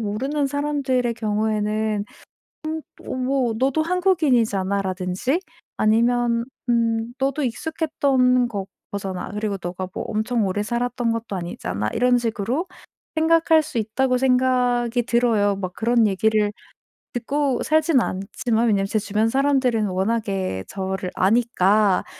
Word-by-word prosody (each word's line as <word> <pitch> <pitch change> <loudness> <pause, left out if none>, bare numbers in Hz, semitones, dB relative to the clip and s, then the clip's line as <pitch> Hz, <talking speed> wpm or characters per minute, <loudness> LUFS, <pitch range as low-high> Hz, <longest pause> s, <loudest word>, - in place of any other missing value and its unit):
모르는 270 +8 -1
사람들의 275 -4 0
경우에는 215 -1 -1 1.0
'음 - - -8
어 - - -2
뭐 255 -2 0
너도 275 +4 +2
한국인이잖아.'라든지 225 - +1 0.4
아니면 235 +2 +2 0.2
'음 230 0 +1
너도 275 +2 0
익숙했던 260 -3 +1
거 200 -4 -4 0.3
거잖아. 195 -2 -4
그리고 210 -1 -2
너가 180 +1 -4
뭐 - - -4
엄청 220 -1 0
오래 205 +2 -1
살았던 240 +1 -1
것도 230 -3 -3
아니잖아.' 170 - -3
이런 250 +1 +3
식으로 235 - -2 0.5
생각할 320 0 +4
수 280 -5 -6
있다고 250 +4 +1
생각이 250 -2 +2
들어요. 225 -5 +2
막 185 -2 -4
그런 230 -1 +3
얘기를 210 +1 +1 0.6
듣고 275 +3 -1
살진 310 -2 +3
않지만 220 +5 -1
왜냐면 200 -3 +2
제 210 - -1
주변 215 +1 0
사람들은 260 -5 +2
워낙에 190 - -1
저를 190 -1 -3
아니까 210 -2 +3
230 Hz, 290 characters per minute, -22 LUFS, 205-255 Hz, 1.0 s, 생각할